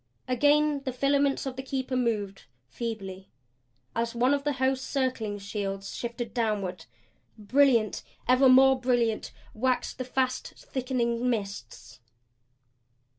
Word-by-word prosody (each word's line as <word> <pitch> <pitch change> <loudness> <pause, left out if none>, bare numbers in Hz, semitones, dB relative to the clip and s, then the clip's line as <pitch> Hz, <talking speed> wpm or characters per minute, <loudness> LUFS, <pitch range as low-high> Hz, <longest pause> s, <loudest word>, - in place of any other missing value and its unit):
Again 290 +3 +3
the 260 - -2
filaments 275 +2 +1
of 265 -2 -4
the - - -2
Keeper 265 -1 -3
moved 210 -6 -1 0.2
feebly. 195 - -6 0.7
As 230 +1 -1
one 250 +4 +3
of 280 -1 0
the 295 0 0
hosts 260 0 0
of - - -7
circling 255 -6 -1
shields 195 -1 -4
shifted 235 -1 -5
downward. 210 -6 -1 0.5
Brilliant, 230 0 +3 0.3
ever 255 +1 +6
more 265 0 +6
brilliant, 240 -3 +1 0.2
waxed 255 +2 -1
the - - -1
fast 255 0 -2
thickening 250 -2 -1
mists. 195 - -5
250 Hz, 125 wpm, -28 LUFS, 215-265 Hz, 0.7 s, ever